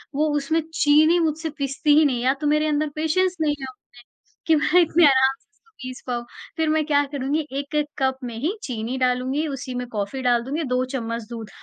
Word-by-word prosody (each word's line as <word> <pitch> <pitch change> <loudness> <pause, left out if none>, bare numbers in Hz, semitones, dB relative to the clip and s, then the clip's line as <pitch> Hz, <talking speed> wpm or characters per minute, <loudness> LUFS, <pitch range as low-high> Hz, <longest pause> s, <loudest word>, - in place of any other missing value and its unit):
वो 305 +2 +2
उसमें 315 +3 0
चीनी 310 +3 +4
मुझसे 320 0 -1
पिसती 280 +1 +1
ही 315 - +6
नहीं, 255 -4 0
या 260 +1 +3
तो 300 - 0
मेरे 300 +1 +2
अंदर 300 0 0
पेशेंस 355 +4 +1
नहीं 295 -2 +1
है 270 - -5
उतने 255 - -19 0.6
कि 325 - +5
मैं 310 +4 +4
इतने 335 0 +4
आराम 265 -1 +5
से - - -38
इसको 450 +6 -33
पीस 255 -1 -7
पाऊँ। 240 -1 -3 0.3
फिर 320 -1 +1
मैं 310 0 +1
क्या 290 -1 +3
करूँगी, 285 +2 -1
1-1 285 +2 -2
कप 265 -1 +1
में 240 -2 -5
ही 325 - -1
चीनी 240 0 -4
डालूँगी, 255 +3 0
उसी 270 -3 -5
में 250 0 -3
कॉफ़ी 220 +3 -4
डाल 240 -2 +2
दूँगी, 290 +6 -3
2 250 -2 0
चम्मच 230 -2 -3
दूध, 225 -3 -7
285 Hz, 210 wpm, -23 LUFS, 255-310 Hz, 0.6 s, ही